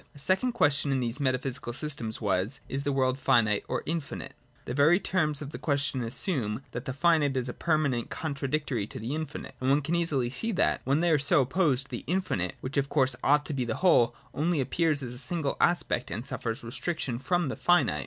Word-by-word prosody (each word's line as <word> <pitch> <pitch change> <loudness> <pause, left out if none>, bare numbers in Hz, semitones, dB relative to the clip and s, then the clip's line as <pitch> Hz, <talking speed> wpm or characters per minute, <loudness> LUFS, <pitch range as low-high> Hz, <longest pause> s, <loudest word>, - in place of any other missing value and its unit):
A - - -13
second 190 - +1
question 145 -9 +2
in 135 - +1
these 120 +2 -1
metaphysical 130 -2 -1
systems 130 -6 -2
was: 105 +5 0
Is 135 - -3
the 145 - -1
world 130 -1 +1
finite 115 -6 +3
or - - -2
infinite? 160 -2 -4 0.3
The 125 - -4
very 150 +7 +4
terms 155 -7 0
of 140 - -8
the - - -7
question 140 -3 0
assume 120 - -1
that 120 +3 -6
the 130 - -2
finite 145 -2 +2
is 125 -1 -1
a 125 - -4
permanent 155 -7 0
contradictory 140 -6 -2
to - - -8
the 115 +5 -4
infinite: 155 -2 -5
and 130 - +1
one 140 +2 +3
can 160 - -2
easily 150 -8 +1
see 225 - -1
that, 185 - +2
when 140 +4 +2
they 175 -1 +2
are 155 - +4
so 140 +1 +4
opposed, 135 -1 +1
the 120 - -5
infinite, 175 - -1
which 130 +2 -4
of 140 0 +1
course 130 -4 +2
ought 145 +1 +4
to 150 - -3
be 130 -2 -1
the 115 -2 -2
whole, 120 -10 +5 0.2
only 160 +1 0
appears 145 +2 +1
as 125 -1 -5
a 125 - 0
single 160 -2 -1
aspect 175 -8 +2
and 115 - -4
suffers 115 -3 -3
restriction 125 0 -2
from 175 +2 0
the - - -3
finite. 175 0 +2
140 Hz, 215 wpm, -28 LUFS, 125-155 Hz, 0.3 s, whole